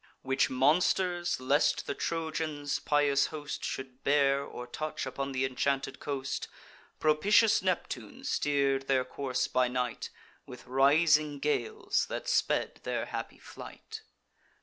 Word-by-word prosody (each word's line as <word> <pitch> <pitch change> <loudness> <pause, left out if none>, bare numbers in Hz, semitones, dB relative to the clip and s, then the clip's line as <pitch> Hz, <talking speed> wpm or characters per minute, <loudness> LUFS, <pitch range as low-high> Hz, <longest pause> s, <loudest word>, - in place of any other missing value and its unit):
Which 130 0 +1
monsters 175 +6 +2
lest 140 +4 +2
the - - -2
Trojans' 155 -2 -2
pious 145 -2 +2
host 150 -2 -6
Should 130 0 -5
bear, 140 -1 +3
or 125 -3 -8
touch 155 +5 -4
upon 135 +1 -4
th' - - -7
inchanted 135 +1 -1
coast, 140 -1 -3 0.5
Propitious 200 +9 +4
Neptune 170 - -3
steer'd 140 -2 +1
their 130 -2 +2
course 130 0 -2
by 125 0 +2
night 125 -1 -3 0.4
With 125 -1 -11
rising 150 +3 +3
gales 430 - -1
that - - -5
sped - - 0
their - - -2
happy - - -6
flight. 440 0 -10
140 Hz, 125 wpm, -30 LUFS, 130-155 Hz, 0.5 s, Propitious